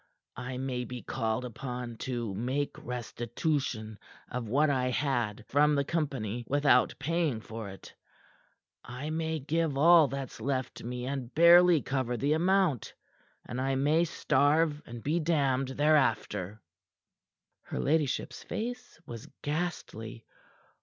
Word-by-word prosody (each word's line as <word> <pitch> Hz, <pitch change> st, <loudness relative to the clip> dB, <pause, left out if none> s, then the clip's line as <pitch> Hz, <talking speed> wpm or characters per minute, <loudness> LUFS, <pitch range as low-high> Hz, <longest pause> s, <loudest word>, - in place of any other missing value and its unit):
I 125 Hz, +1 st, -5 dB
may 130 Hz, -1 st, -2 dB
be 125 Hz, 0 st, -7 dB
called 115 Hz, 0 st, -2 dB
upon 125 Hz, -1 st, -6 dB
to 120 Hz, -4 st, -3 dB
make 130 Hz, +8 st, -2 dB
restitution 120 Hz, -1 st, -3 dB, 0.3 s
of 125 Hz, -3 st, -4 dB
what 145 Hz, +5 st, +3 dB
I 125 Hz, -2 st, +1 dB
had 120 Hz, -6 st, -1 dB
from 150 Hz, +2 st, +3 dB
the 140 Hz, -, +2 dB
company 135 Hz, -9 st, -2 dB
without 145 Hz, -3 st, +3 dB
paying 155 Hz, -4 st, 0 dB
for 110 Hz, -1 st, -7 dB
it 95 Hz, -, -12 dB, 0.9 s
I 130 Hz, +6 st, -6 dB
may 160 Hz, 0 st, -1 dB
give 155 Hz, 0 st, -1 dB
all 165 Hz, +1 st, +7 dB
that's 135 Hz, -1 st, -6 dB
left 130 Hz, -2 st, -2 dB
me 125 Hz, +1 st, -5 dB
and 130 Hz, -2 st, -4 dB
barely 170 Hz, -1 st, +7 dB
cover 130 Hz, -2 st, -1 dB
the 145 Hz, +4 st, +1 dB
amount, 175 Hz, -, +1 dB, 0.5 s
and 125 Hz, +2 st, -4 dB
I 135 Hz, 0 st, 0 dB
may 150 Hz, +5 st, +3 dB
starve 150 Hz, 0 st, +2 dB
and 115 Hz, -1 st, -8 dB
be 160 Hz, +4 st, +1 dB
damned 140 Hz, -5 st, +1 dB
thereafter." 130 Hz, -, +1 dB, 1.0 s
Her -, -, -6 dB
ladyship's 150 Hz, -2 st, 0 dB
face 245 Hz, 0 st, -5 dB
was 115 Hz, -2 st, -8 dB, 0.2 s
ghastly. 145 Hz, -8 st, -4 dB
135 Hz, 125 wpm, -30 LUFS, 120-155 Hz, 1.0 s, all